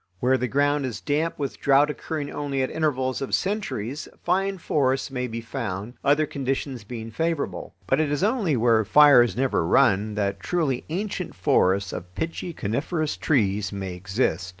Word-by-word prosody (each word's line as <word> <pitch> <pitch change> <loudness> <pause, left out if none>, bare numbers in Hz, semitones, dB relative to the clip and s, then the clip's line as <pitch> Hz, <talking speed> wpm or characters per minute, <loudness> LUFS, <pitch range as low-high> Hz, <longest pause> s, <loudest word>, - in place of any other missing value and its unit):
Where 130 +1 +3
the 125 -1 -1
ground 145 +2 +1
is 110 -7 -5
damp, 150 - -1
with 140 -3 -4
drouth 140 +1 +5
occurring 150 -1 -5
only 140 -2 -2
at 130 - -2
intervals 130 -5 -1
of 135 - 0
centuries, 155 - -3 0.2
fine 195 +2 +1
forests 135 -5 0
may 125 -1 -2
be 115 0 -5
found, 115 -3 -5
other 150 +2 +3
conditions 135 -3 -3
being 115 +1 -7
favorable. 160 +4 -2
But 130 - +1
it 150 -2 0
is 145 +4 0
only 205 - +1
where 115 -1 +3
fires 120 0 +6
never 130 -9 +1
run 100 +5 +3
that 100 -2 -1
truly 140 - -1
ancient 185 0 -3
forests 95 +1 +2
of 90 +1 -8
pitchy 165 - -3
coniferous 150 - -2
trees 105 - +1
may 95 -2 -5
exist. 95 -1 -1
130 Hz, 165 wpm, -25 LUFS, 110-150 Hz, 0.2 s, fires